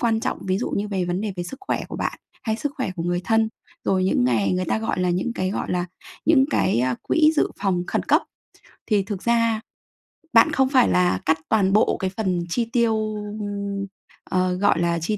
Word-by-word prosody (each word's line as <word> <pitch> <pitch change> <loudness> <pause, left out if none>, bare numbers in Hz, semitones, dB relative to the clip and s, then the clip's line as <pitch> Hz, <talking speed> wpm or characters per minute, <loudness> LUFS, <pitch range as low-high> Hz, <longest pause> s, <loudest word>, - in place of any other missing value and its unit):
quan 225 -2 +1
trọng, - - -2
ví 185 +1 +1
dụ 245 - -2
như 205 +1 -2
về 190 -3 -1
vấn 175 +2 -2
đề 210 -2 -2
về 175 - -2
sức 265 +10 -8
khỏe - - -1
của - - -6
bạn - - -3 0.2
hay 220 -1 -1
sức 285 +3 -3
khỏe 260 -9 -2
của 165 - -3
người 175 +1 0
thân. 225 -1 +2 0.4
Rồi 185 -1 +2
những 155 -9 +2
ngày 115 - +2
người 185 0 0
ta 220 - 0
gọi 225 -4 -2
là 180 -1 +2
những 185 +7 -1
cái, 185 0 -1
gọi - - -3
là, 180 -1 0 0.4
những 290 -4 +5
cái 155 - +2 0.2
quỹ 315 -1 +4
dự - - +2
phòng 180 -3 +1
khẩn - - -1
cấp. - - +3 0.6
Thì 205 -3 +2
thực 200 -2 -5
ra 230 -2 +2 0.7
bạn 230 - +6
không 265 -1 +2
phải 265 - +4
là 90 +1 +2
cắt 160 0 +2
toàn 195 -3 +3
bộ 215 - +3
cái 190 - -1
phần 185 -5 0
chi 235 +6 0
tiêu, 220 -3 +1 1.1
ờ, 185 0 +1
gọi 200 0 +2
là, 170 -1 +1
chi 210 +5 -1
195 Hz, 220 wpm, -23 LUFS, 180-225 Hz, 1.1 s, bạn